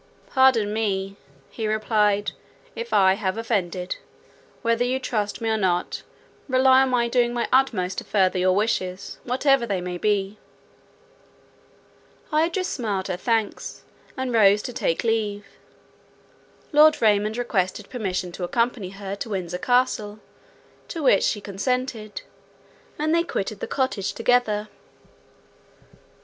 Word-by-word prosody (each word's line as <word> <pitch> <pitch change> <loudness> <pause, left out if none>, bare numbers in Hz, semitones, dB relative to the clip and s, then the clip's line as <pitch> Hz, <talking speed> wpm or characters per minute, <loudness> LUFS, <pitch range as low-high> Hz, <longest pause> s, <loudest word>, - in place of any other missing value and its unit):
"Pardon 255 -6 +4
me," 195 -3 -1 0.4
he 220 -2 -3
replied, 210 -1 +1 0.4
"if 470 0 -6
I 190 -1 +5
have 195 0 -2
offended. 185 -6 -2 0.7
Whether 230 +1 +2
you 250 +1 0
trust 215 -5 -2
me 225 - -2
or 220 - +1
not, 180 -3 0 0.5
rely 260 0 +5
on 265 - +2
my 240 -2 +2
doing 240 0 +1
my 240 - 0
utmost 215 -9 +2
to - - -9
further 190 -2 +1
your 185 0 +3
wishes, 190 -3 -2
whatever 260 0 +2
they 195 -3 -1
may 180 0 -5
be." 205 0 0 1.9
Idris 335 +4 +1
smiled 205 -7 -2
her 185 - -1
thanks, 225 +2 -2 0.3
and 260 -2 -2
rose 210 -2 +5
to 250 - -5
take 165 - -1
leave. 210 -3 -1 1.3
Lord 305 0 +6
Raymond 215 0 +2
requested 200 -4 -1
permission 185 -7 -3
to 180 - -7
accompany 230 +1 -1
her 195 0 -6
to 225 - -5
Windsor 180 -3 -3
Castle, 245 -3 +1 0.7
to 330 -3 -5
which 205 -7 +5
she 205 - 0
consented, 220 +2 -3 0.7
and 310 +1 0
they 335 - +4
quitted 215 - -3
the - - -4
cottage 260 -7 -1
together. 225 -3 +1
215 Hz, 130 wpm, -24 LUFS, 195-245 Hz, 1.9 s, Lord